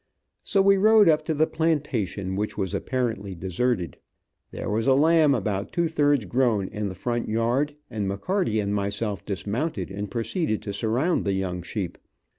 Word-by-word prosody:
So 195 -1 +2
we 195 0 +5
rode 215 0 +6
up 155 -1 +4
to 160 - -1
the 155 +2 +3
plantation, 135 - -1
which 105 +2 -3
was 95 -4 -1
apparently 115 -7 -2
deserted. 95 +2 -1 0.5
There - - -6
was 110 +4 0
a 135 - +5
lamb 155 0 +4
about 100 -3 -2
two 170 -1 +1
thirds 145 -6 +2
grown, 115 -3 +1
in 105 -1 -3
the 95 - -7
front 120 +5 -2
yard, 120 +7 0
and 105 -5 -3
McCarty 110 - 0
and 100 0 -2
myself 100 -1 -2
dismounted 105 - -3
and 100 +1 -5
proceeded 115 - -1
to 100 - -4
surround 120 - 0
the 100 - 0
young 95 -2 -2
sheep. 90 0 -5
115 Hz, 170 wpm, -25 LUFS, 100-150 Hz, 0.5 s, rode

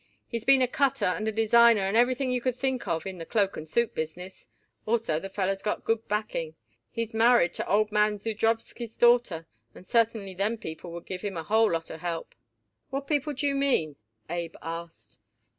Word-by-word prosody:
"He's 230 -2 -4
been 270 -1 +6
a - - +3
cutter 275 0 +1
and 210 +4 0
a - - +1
designer 225 0 +5
and 195 +2 -1
everything 255 +2 +2
you 250 -1 0
could 255 -1 0
think 260 -4 -1
of 165 0 -1
in 190 -2 -6
the - - -5
cloak 200 -2 +1
and 155 0 -8
suit 235 +6 +1
business. 175 +4 -6 0.4
Also 215 -9 +1
the 195 - -7
feller's 195 0 -1
got 210 - -2
good 225 0 -1
backing. 200 -7 -2 0.3
He's 230 -1 -4
married 225 -5 +4
to - - -4
old 210 +2 +2
man 210 0 +2
Zudrowsky's 225 +2 -2
daughter 240 -9 +3 0.3
and 180 - -13
certainly 225 -4 +1
them 205 +5 -1
people 160 -2 -7
would 170 0 -8
give 185 -1 -6
him 200 -4 -4
a 165 - -3
whole 220 +4 +3
lot 165 -1 -2
of 160 - -8
help." 170 -2 -4 0.6
"What 275 +1 -3
people 295 0 0
do 285 +2 -3
you 280 - +2
mean?" 270 - +1 0.3
Abe 170 -1 -4
asked. 165 -9 -8
210 Hz, 195 wpm, -27 LUFS, 175-235 Hz, 0.6 s, been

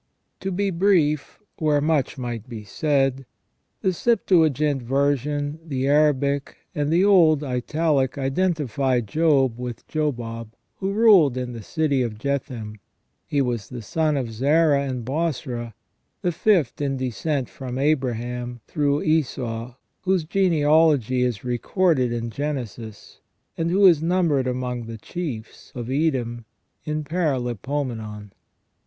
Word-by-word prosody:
To 195 - -3
be 195 +2 0
brief, 165 -6 +1 0.2
where 150 -2 +2
much 150 -2 0
might 120 -2 -5
be 110 -3 -7
said, 135 +2 0 0.6
the 190 - +1
Septuagint 160 - +2
version, 145 +3 0
the 135 -4 -2
Arabic, 140 -1 +2 0.2
and 145 0 -1
the 175 +4 +4
old 165 -7 +5
Italic 135 +1 0
identify 135 - 0
Job 135 0 +2
with 125 -2 -6
Jobab, 115 -7 -3 0.2
who 195 0 -2
ruled 200 - +5
in 125 -1 -3
the 115 - -7
city 145 +3 0
of 115 -4 -3
Jethem. 120 -4 -3 0.5
He 140 -1 +1
was 120 -4 -3
the 125 -3 -7
son 155 +5 0
'of 125 -4 -3
Zara 140 +4 +3
and 125 -3 -4
Bosra, 125 -6 -3 0.5
the 180 - +2
fifth 170 - +1
in 135 -1 -1
descent 130 +2 -2
from 130 -2 -7
Abraham, 125 -4 -1
through 145 -1 0
Esau, 125 -6 -1 0.3
whose 185 -2 +1
genealogy 155 - +3
is 125 -5 -1
recorded 130 - +1
in 115 -1 -3
Genesis, 120 -6 -6 0.4
and 165 0 -1
who 195 +3 +4
is 170 -5 +6
numbered 165 -6 +1
among 125 -2 -3
the 115 0 -7
chiefs 120 -4 -7
of 120 0 -5
Edom 130 -6 -1 0.4
in 150 0 -2
Paralipomenon. 125 - -3
140 Hz, 125 wpm, -23 LUFS, 125-155 Hz, 0.6 s, is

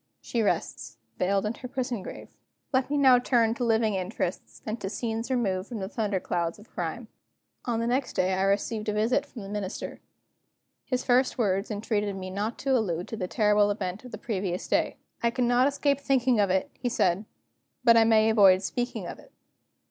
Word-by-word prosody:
She 235 - -2
rests, 210 - -2 0.2
veiled 195 +2 +1
in 210 - -1
her 250 - -8
prison 245 -4 -3
grave. - - -9 0.4
Let 260 +1 +2
me 290 - 0
now 260 -3 +6
turn 235 -3 +2
to 240 - -4
living 225 -2 +2
interests, 185 -1 -4
and 220 +2 -4
to 190 - -3
scenes 225 +2 -3
removed 200 -7 0
from 240 - -5
the 190 -2 -4
thunder 205 -2 -1
clouds 170 -2 -2
of 210 +2 -17
crime........ 180 +7 -4 0.6
On 235 -2 0
the 230 - 0
next 255 +3 0
day 185 +1 +1
I 190 - 0
received 210 +2 0
a - - 0
visit 220 +4 +1
from 230 - -9
the 195 - -8
Minister. 205 -2 -5 0.8
His 255 -1 -1
first 255 +1 +2
words 195 -3 0
entreated 210 -1 -1
me 185 -1 -6
not 210 +4 -3
to 270 -1 +3
allude 180 -7 -1
to - - -4
the 185 -5 -3
terrible 210 -1 +3
event 195 0 -3
of 250 - -11
the 215 - -6
previous 195 -5 -3
day. - - +1 0.2
"I 235 - +3
cannot 245 +1 +3
escape 280 0 +1
thinking 260 -4 +2
of 200 -2 +3
it," 190 0 0
he 245 - -3
said, 190 -3 +1 0.6
"but 235 -2 +7
I 230 - +7
may 220 0 +4
avoid 195 -3 +6
speaking 245 +5 -3
of - - -7
it." - - -18
220 Hz, 200 wpm, -27 LUFS, 195-245 Hz, 0.8 s, but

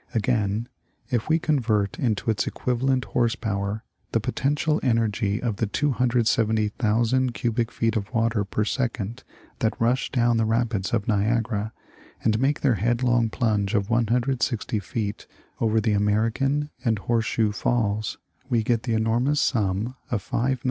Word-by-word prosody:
Again, 110 -1 0 0.4
if 120 +1 0
we 160 - +4
convert 115 - 0
into 115 -2 0
its 105 - -1
equivalent 130 +1 0
horse 115 -2 +1
power 100 0 -3 0.3
the 115 - +3
potential 150 +7 0
energy 110 -4 +1
of 115 -5 -2
the 115 - 0
270,000 115 -1 +1
cubic 115 -2 -1
feet 115 0 0
of 105 0 -2
water 115 -3 +1
per 105 +2 -1
second 120 -1 -2 0.4
that 110 - 0
rush 120 +3 +1
down 120 -2 +2
the 115 - +2
rapids 110 -3 0
of 110 -3 0
Niagara 110 0 0 0.5
and 110 -1 +2
make 140 +3 +1
their 135 -4 +3
headlong 120 0 +2
plunge 105 -4 0
of 100 +1 0
160 120 -1 +1
feet 105 +2 -4 0.3
over 110 -1 +2
the 110 0 +1
American 115 +8 +1
and 115 -3 +2
Horse 115 +3 0
shoe 110 -1 +1
falls, 110 -1 -1 0.3
we 115 -3 +2
get 115 0 +1
the 115 -1 -1
enormous 120 +6 +1
sum 110 0 0
of 105 -5 -3
5,847,000. 130 +3 0
115 Hz, 145 wpm, -25 LUFS, 105-125 Hz, 0.5 s, we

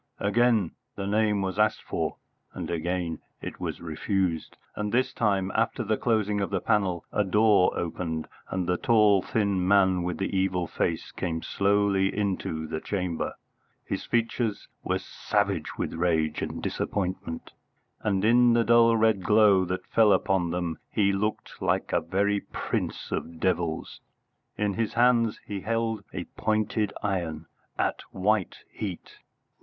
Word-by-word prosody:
Again 110 -2 +2 0.2
the 100 - -4
name 105 0 +2
was 95 +2 -3
asked 105 0 +2
for, - - -2 0.4
and - - -4
again 85 0 -2 0.2
it - - -7
was - - -4
refused; 85 +1 -2 0.2
and 105 -1 -2
this 130 +2 +1
time, 100 -5 +1
after 115 +2 0
the 110 0 +1
closing 105 -3 +1
of 100 - -1
the 100 - 0
panel, 95 -5 0
a 105 - +2
door 105 -1 +4
opened, 80 -2 -3 0.2
and 95 -1 -1
the 90 +1 +1
tall 105 -4 +4
thin 100 -4 0
man 95 -2 +4
with 90 0 -2
the 95 0 -2
evil 95 -2 +1
face 80 0 -2
came 80 -2 -3
slowly 100 -1 +2
into 95 -6 -1
the 80 0 -4
chamber. 90 -5 -2 0.5
His - - -3
features 115 -2 -1 0.2
were - - 0
savage 100 -6 -2
with - - -2
rage 80 -3 0
and - - -4
disappointment, 90 -4 -3 0.5
and 100 -1 +1
in 120 +1 +5
the 115 0 +4
dull 115 0 +5
red 110 -3 +3
glow 105 -2 +5
that 90 +1 -3
fell 110 -2 +4
upon 95 -4 +1
them 85 -2 -2
he 100 -1 +2
looked 105 +2 -3
like - - 0
a - - +3
very 100 +2 +1
prince - - -4
of 85 -1 -4
devils. 85 -3 -1 0.6
In 105 -1 0
his 115 +1 -2
hand 120 -2 +3
he 100 -2 -5
held 115 -1 -1
a - - -4
pointed 110 -1 0
iron 85 -6 -2 0.3
at - - 0
white 95 0 0
heat. 95 -5 -6
100 Hz, 150 wpm, -27 LUFS, 90-110 Hz, 0.6 s, in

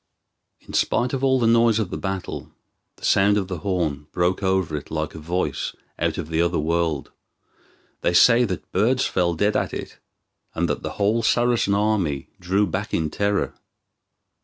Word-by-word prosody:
In - - -13
spite 125 +2 +1
of 135 0 -2
all 130 -1 +4
the 120 - +1
noise 115 -1 +4
of 105 -5 -2
the - - -3
battle, 95 -2 -4 0.5
the - - -8
sound 100 +1 +4
of 95 -3 -1
the 90 -3 -5
horn 80 -6 -2
broke 90 +3 0
over 95 -5 0
it 75 - -6
like 80 -1 -3
a 80 - -8
voice 85 +4 -2 0.2
out - - 0
of 75 - -5
the 80 0 +1
other 85 -1 +1
world. 80 -1 -1 0.9
They 85 - +1
say 120 +6 +6
that 95 -5 -5
birds 120 +7 +2
fell 85 -2 0
dead 105 +5 +1
at - - -1
it, - - -7 0.6
and 85 +1 +1
that 75 - -2
the - - -5
whole 105 +3 +1
Saracen 120 -3 +2
army 100 -10 0
drew 95 +4 +1
back 85 - -3
in 80 -2 -1
terror. 100 0 0
95 Hz, 180 wpm, -23 LUFS, 85-105 Hz, 0.9 s, say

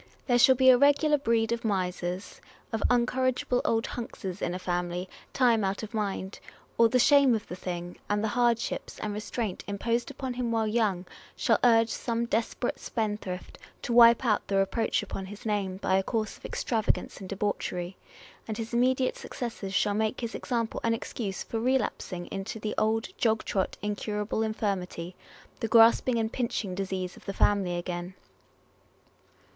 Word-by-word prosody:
There 245 -2 +3
shall 260 +2 +7
be 260 0 +7
a 250 - +5
regular 290 +1 +4
breed 230 -3 +1
of 235 0 -1
misers, 180 -2 -2 0.3
of 225 - -1
incorrigible 250 +1 +1
old 225 0 +1
hunkses 200 -5 -6
in 175 - -1
a - - -2
family, 180 0 -2 0.2
time 235 -4 +3
out 195 +3 -1
of 220 - -7
mind; 200 -3 -3 0.4
or 230 -1 +5
the 255 - +3
shame 275 -1 +6
of 215 - -5
the 180 - -6
thing, 175 -1 -6
and 205 +1 +1
the 220 - +1
hardships 240 0 0
and 210 -1 -3
restraint 210 -1 -4
imposed 230 +5 -1
upon 265 -2 -5
him 245 -1 -2
while 225 -1 +1
young, 210 -5 0 0.3
shall - - +2
urge 230 -2 +5
some 235 +1 -2
desperate 235 +1 -1
spendthrift 210 -5 -4 0.2
to 240 - -2
wipe 235 +1 +7
out 215 -3 +1
the 195 - +1
reproach 195 +4 +1
upon 190 -1 -6
his 210 +5 -10
name 200 -3 -1
by 190 -1 +2
a - - +2
course 215 +1 -2
of - - -14
extravagance 225 -3 -1
and 190 - -9
debauchery; 190 -3 -2 0.5
and 220 -1 -4
his 225 +1 -5
immediate 255 +2 +2
successors 220 -5 -5
shall 205 0 +2
make 215 +2 -1
his 235 -1 -4
example 235 -4 -2
an 230 0 +2
excuse 205 -3 -4
for 225 - -4
relapsing 230 -7 -1
into 195 +3 -5
the 215 0 -3
old 220 +1 +1
jog 220 -2 +2
trot 190 -2 -1
incurable 210 +1 -2
infirmity, 190 -5 -2 0.4
the 225 - -1
grasping 230 +2 +5
and 225 0 -1
pinching 230 -6 -2
disease 185 -1 -3
of - - -16
the 195 - -3
family 190 -4 +2
again. 175 +1 -5
220 Hz, 170 wpm, -28 LUFS, 195-235 Hz, 0.5 s, shall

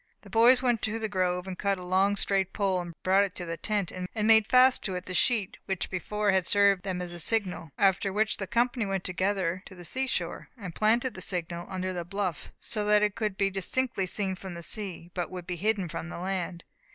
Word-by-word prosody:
The - - -14
boys 245 +3 +6
went 240 -3 +2
to 220 +1 -1
the 220 -1 -2
grove, 180 -2 0
and 190 -1 -5
cutting 195 -3 0
a - - -8
long 190 +3 +3
straight 195 -2 0
pole, 185 -4 0
brought 190 +2 +5
it 195 -2 -4
to 175 - -5
the 165 0 -3
tent, 205 0 -1
and 185 0 -5 0.2
made 220 -1 +6
fast 255 0 +5
to 190 - -2
it 180 0 -5
the 185 - -6
sheet 210 0 +1
which 190 -2 -2
before 205 +3 0
had 190 -2 +1
served 200 -2 +4
them 180 -2 -3
as 175 -1 -6
a 175 - -6
signal; 185 -3 0
after 195 0 +3
which 215 +2 +1
the 195 - -4
company 240 +1 +1
went 195 -2 -2
together 185 -1 -1
to 190 - -12
the 175 -1 -11
sea 265 +8 -2
shore, - - -3
and 190 -6 -7
planted 235 +6 +2
the 185 - -8
signal 175 -1 -3
under 185 0 -3
the 175 -1 -3
bluff, 185 -2 -3
so 215 -3 -2
that 210 0 +4
it 210 -1 +2
could 210 -3 -2
be 195 -1 +2
distinctly 195 +1 -1
seen 195 0 -1
from 185 -2 -7
sea, 185 -4 -4
but 175 -2 -2
would 180 -1 -7
be 180 - -3
hidden 200 +1 0
from 165 +1 -6
the - - -6
land. 180 -1 -3
195 Hz, 230 wpm, -28 LUFS, 180-210 Hz, 0.2 s, boys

